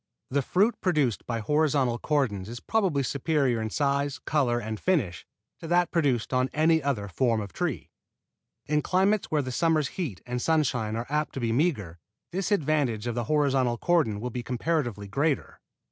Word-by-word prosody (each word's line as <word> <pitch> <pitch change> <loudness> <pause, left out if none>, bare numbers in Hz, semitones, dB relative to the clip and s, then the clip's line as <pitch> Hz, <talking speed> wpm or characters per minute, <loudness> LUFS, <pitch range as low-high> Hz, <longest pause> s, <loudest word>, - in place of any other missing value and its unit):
The 140 +1 +2
fruit 200 - +2
produced 150 - +1
by 115 -2 -2
horizontal 140 -2 +1
cordons 120 -11 0
is 120 +1 -6
probably 185 - +1
superior 140 -3 0
in 110 - -2
size, 140 +1 0
color 140 -5 0
and 110 -2 -4
finish 140 - 0 0.3
to 165 - -8
that 175 +1 +2
produced 135 -9 +1
on 130 +1 +2
any 160 +1 +3
other 130 -8 -1
form 115 +4 +1
of 100 -5 -6
tree. - - -3 0.7
In 150 0 +1
climates 190 +5 +1
where 150 -2 +1
the 130 - -4
summer's 155 +1 +1
heat 140 - -4
and 125 0 -3
sunshine 125 -9 +1
are 115 +1 -3
apt 150 +1 -1
to - - -2
be 115 -2 0
meager, 115 - 0 0.3
this 190 +3 -2
advantage 145 - +1
of 120 - -1
the 120 0 -2
horizontal 135 -4 +2
cordon 150 -10 +1
will 125 +3 -4
be 125 - -4
comparatively 120 - -2
greater. 140 +6 -1
135 Hz, 175 wpm, -27 LUFS, 120-155 Hz, 0.7 s, any